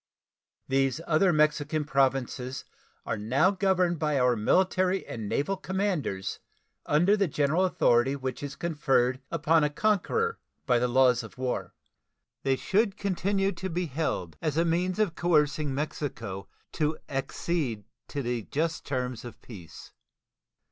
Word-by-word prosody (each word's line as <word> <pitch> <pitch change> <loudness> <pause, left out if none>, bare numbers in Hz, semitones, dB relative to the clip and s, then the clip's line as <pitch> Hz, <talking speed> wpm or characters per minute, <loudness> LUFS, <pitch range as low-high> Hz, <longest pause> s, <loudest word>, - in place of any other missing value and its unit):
These 135 +1 +1
other 170 +3 +3
Mexican 150 -1 +1
Provinces 135 -2 0 0.4
are 110 - -2
now 130 - +3
governed 185 -4 +1
by 150 -2 +1
our 125 -1 +3
military 185 - +2
and 110 -3 -6
naval 195 +8 0
commanders 185 - -2 0.5
under 175 +8 +4
the 200 -2 +1
general 150 +5 +1
authority 130 -6 +3
which 130 -2 -4
is 140 -1 -5
conferred 135 -6 +1
upon 165 0 +2
a 150 - +2
conqueror 215 - 0 0.3
by 120 -1 +3
the 125 - +1
laws 125 0 +4
of 110 -2 -12
war. 130 -1 -3 0.7
They 135 -1 +2
should 200 - +1
continue 195 0 0
to 190 +1 -5
be 180 +1 -1
held, 140 - -3
as 155 -2 -1
a 165 - +3
means 180 +3 0
of 210 -6 +1
coercing 150 -4 +1
Mexico 135 -9 -4 0.2
to 155 0 -1
accede 135 -4 -2 0.2
to 125 -4 -2
just 155 +7 -2
terms 125 -3 -3
of 120 -2 -10
peace. 95 -9 -11
150 Hz, 135 wpm, -28 LUFS, 130-180 Hz, 0.7 s, under